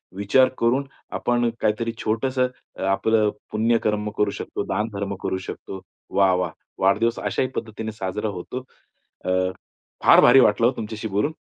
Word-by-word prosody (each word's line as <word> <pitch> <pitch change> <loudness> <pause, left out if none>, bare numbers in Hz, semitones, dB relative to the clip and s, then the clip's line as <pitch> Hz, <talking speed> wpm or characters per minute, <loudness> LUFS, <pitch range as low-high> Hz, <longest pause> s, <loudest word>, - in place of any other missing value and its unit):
विचार 115 +7 +4
करून 125 +4 +2 0.4
आपण 120 -1 +1
काहीतरी 110 +2 0
छोटंसं 125 +4 +1 0.3
अ, - - -4
आपलं 105 +2 +2 0.2
पुण्यकर्म 110 -1 +1
करू 105 -1 +2
शकतो, - - -4
दानधर्म 100 -1 -2
करू 95 - -1
शकतो. 95 -1 -7 0.3
वाह, 95 -2 +4
वाह! 90 -2 -1 0.3
वाढदिवस 110 +5 +2
अशाही 130 - 0
पद्धतीने 110 0 -4
साजरा 105 0 -3
होतो. 100 +7 -6 0.6
अ, - - -1 0.7
फार - - +8
भारी 135 - +8
वाटलं 115 -1 +4
हो, 125 - +1
तुमच्याशी 110 0 -4
बोलून, 105 +9 0
110 Hz, 140 wpm, -23 LUFS, 100-115 Hz, 0.7 s, फार